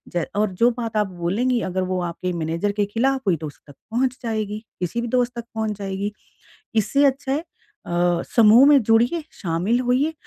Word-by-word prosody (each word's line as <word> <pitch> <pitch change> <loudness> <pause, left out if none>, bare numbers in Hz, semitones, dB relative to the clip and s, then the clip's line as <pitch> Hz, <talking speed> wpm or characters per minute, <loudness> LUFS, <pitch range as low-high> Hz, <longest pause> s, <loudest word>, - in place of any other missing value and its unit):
ज 175 - +1
और 210 -1 +1
जो 230 +6 +4
बात 225 -2 -3
आप 210 -1 +2
बोलेंगी 235 +9 +1
अगर 185 +1 -1
वो 185 - -1
आपके 180 +1 -4
मैनेजर 170 +4 -1
के 205 - +3
खिलाफ 260 +6 0
हुई 175 -4 +3
तो 155 - -6
उस 145 - -12
तक 145 - -14 0.2
पहुँच 255 +2 0
जाएगी, 215 -1 -3 0.2
किसी 180 +7 -2
भी 240 - -3
दोस्त 245 0 +1
तक 235 - -7
पहुँच 220 -2 -2
जाएगी। 200 +1 -3 0.6
इससे 225 +7 +2
अच्छा 270 0 0
है 300 +4 -1 0.4
अ, 175 0 +1
समूह 230 +4 +7
में 285 -3 +6
जुड़िए, 235 +10 +3
शामिल 185 +6 -1
होइए, 255 +5 +1
220 Hz, 195 wpm, -22 LUFS, 185-245 Hz, 0.6 s, समूह